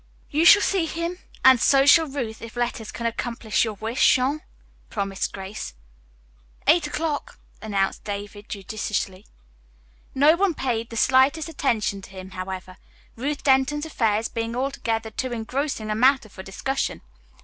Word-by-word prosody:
"You 310 +3 +2
shall 400 +3 +8
see 370 -5 +1
him 335 +3 -4 0.3
and 260 -2 +7
so 275 -1 +5
shall 320 +3 +6
Ruth, 250 -6 -5
if 230 +1 -9
letters 240 -2 -2
can 235 - -6
accomplish 230 -1 -1
your 220 -2 -3
wish, 225 +5 +3
Jean," 270 +4 0 0.5
promised 195 -2 -2
Grace. 195 - -7 0.9
"Eight 310 +1 +4
o'clock," 320 +11 -3 0.2
announced 200 -3 -1
David 205 0 -6
judicially. 200 -1 -4 0.9
No 290 +4 +6
one 370 -2 +1
paid 230 -4 -2
the 230 - -7
slightest 265 +7 +3
attention 225 -9 -1
to - - -12
him, 190 0 -10
however, 185 0 -6 0.4
Ruth 280 +5 -3
Denton's 275 +2 +2
affairs 225 -7 0
being 230 0 -4
altogether 230 -4 -2
too 255 +3 -3
engrossing 235 -1 -3
a - - 0
matter 260 0 +3
for 190 - -10
discussion. 265 +8 -3
235 Hz, 145 wpm, -24 LUFS, 210-285 Hz, 0.9 s, shall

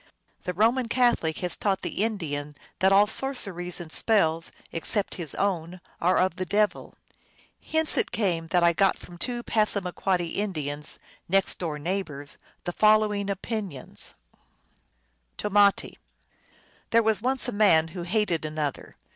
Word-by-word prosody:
The 180 - -2
Roman 230 +5 +2
Catholic 235 -10 +2
has 180 -2 0
taught 195 -2 -1
the 200 - -2
Indian 150 -9 -3 0.2
that 190 +1 +4
all 200 +1 +6
sorceries 200 -8 -1
and 170 -2 -8
spells 165 -8 +2 0.2
except 195 +5 0
his 155 -5 -2
own 180 -3 -2 0.2
are 180 +2 +3
of 185 -1 +1
the 185 - -2
devil. 210 +2 0 0.7
Hence 315 0 +2
it - - -1
came 175 -7 0
that 175 +1 +2
I 170 0 +5
got 195 +3 +2
from 175 -1 -13
two 240 +2 -2
Passama 200 -6 0
quoddy 175 -3 -1
Indians, 150 -8 -2 0.3
next 195 +1 +2
door 160 -4 -3
neighbors, 150 -4 -4 0.3
the 175 - -4
following 215 -1 +3
opinions: 200 - -4 1.2
Tomati. 205 -1 +2 0.4
" - - -33
There 230 0 +4
was 220 -1 +1
once 260 +1 +2
a - - -2
man 185 -7 +4
who 175 +1 -7
hated 175 -2 0
an 155 0 -6
other. 145 -3 -4
190 Hz, 145 wpm, -26 LUFS, 165-215 Hz, 1.2 s, all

